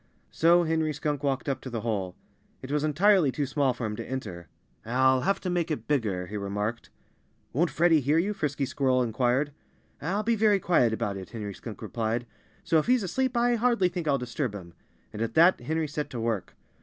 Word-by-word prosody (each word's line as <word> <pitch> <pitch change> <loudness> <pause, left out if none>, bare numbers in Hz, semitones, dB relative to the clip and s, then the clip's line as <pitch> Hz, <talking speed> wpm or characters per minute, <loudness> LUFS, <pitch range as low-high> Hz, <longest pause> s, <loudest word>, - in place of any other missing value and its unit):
So 170 +2 +4
Henry 160 -1 0
Skunk 150 -1 -2
walked 135 -3 -1
up 135 -2 -1
to 130 - -7
the 115 -3 -4
hole. 100 -6 -2 0.5
It 130 - -6
was 150 0 0
entirely 165 +1 +4
too 145 +2 -2
small 135 0 +1
for 120 -1 -4
him 105 -1 -3
to - - -7
enter. 90 -10 -5 0.4
"I'll 130 +2 +3
have 195 +6 +1
to 185 - -3
make 175 -1 0
it 155 - -4
bigger," 105 -11 0
he 105 +4 -6
remarked. 105 +3 -3 0.6
"Won't 165 +7 +2
Freddie 160 +2 +3
hear 145 +4 +2
you?" 195 +5 +1
Frisky 145 -6 -2
Squirrel 130 -1 +1
inquired. 125 +4 +1 0.5
"I'll 195 +7 -1
be 230 +1 +2
very 210 -2 +3
quiet 170 -11 +3
about 100 -2 -2
it," 95 - -8
Henry 105 -3 -6
Skunk 110 +2 -9
replied. 115 +2 -2 0.4
"So 165 -3 +3
if 155 - -3
he's 250 -3 +3
asleep 255 +7 -1
I 240 +1 +3
hardly 235 -5 +2
think 175 -3 -4
I'll 140 -2 +3
disturb 125 -2 -3
him." 85 -4 -9 0.4
And 105 - -6
at 115 0 -2
that 170 +3 +6
Henry 160 +5 -1
set 150 +1 -4
to 120 - -5
work. 115 -4 -2
140 Hz, 205 wpm, -27 LUFS, 115-170 Hz, 0.6 s, that